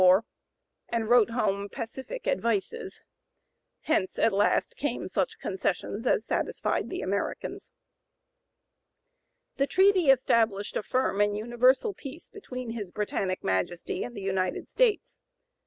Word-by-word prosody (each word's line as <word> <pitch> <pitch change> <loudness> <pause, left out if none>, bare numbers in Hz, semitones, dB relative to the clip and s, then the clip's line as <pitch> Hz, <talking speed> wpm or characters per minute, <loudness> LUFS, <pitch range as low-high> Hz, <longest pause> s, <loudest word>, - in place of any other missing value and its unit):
094) 185 - +7
war, 215 +4 0 0.6
and 225 -2 -1
wrote 240 -3 +6
home 200 -4 -1
pacific 265 - -6
advices. 410 - -1 0.8
Hence, 190 -11 0
at 225 - +3
last, 205 +1 +2
came 280 -4 -2
such 190 0 -1
concessions 200 +4 -2
as 220 - +2
satisfied - - -1
the - - -4
Americans. - - -3 1.9
The 275 - +2
treaty 375 0 +4
established 225 -6 +3
"a - - 0
firm 210 -1 0
and 205 0 +2
universal 250 - +3
peace 300 +1 -10
between 255 - -7
his 215 -5 -5
Britannic 190 -1 -2
Majesty 95 - -1
and 245 - -7
the 200 - -6
United 190 -1 -1
States." - - +1
230 Hz, 125 wpm, -28 LUFS, 200-270 Hz, 1.9 s, 094